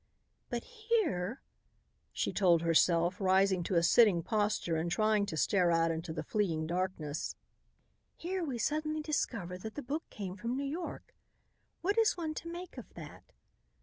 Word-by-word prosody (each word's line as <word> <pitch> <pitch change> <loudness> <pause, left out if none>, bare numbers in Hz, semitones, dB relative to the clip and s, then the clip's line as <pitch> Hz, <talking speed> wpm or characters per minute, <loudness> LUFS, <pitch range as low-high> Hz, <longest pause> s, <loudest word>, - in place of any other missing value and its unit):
"But 240 -1 -3
here," 430 - -1 0.7
she - - -2
told 175 -4 +4
herself, 170 +2 +3
rising 190 -1 +3
to 185 - -1
a 170 - +4
sitting 195 -3 +5
posture 210 -5 0
and 160 +2 -1
trying 215 +2 +2
to 160 - -4
stare 175 +5 +3
out 165 0 +3
into 165 +1 -4
the 155 -1 -4
fleeing 165 -4 0
darkness, 170 -3 -2 0.8
"here 365 +1 -3
we 270 -6 -3
suddenly 305 +5 -1
discover 200 - -2
that 220 +3 -7
the 290 - -5
book 295 +6 -4
came 190 -3 -6
from 235 +4 -3
New 280 - -2
York. 325 +5 -5 0.7
What 405 +5 +1
is 445 -4 +3
one 320 -3 -2
to 335 - -6
make 350 -5 -7
of 245 - -12
that? 155 -3 -11
205 Hz, 160 wpm, -32 LUFS, -, 0.8 s, sitting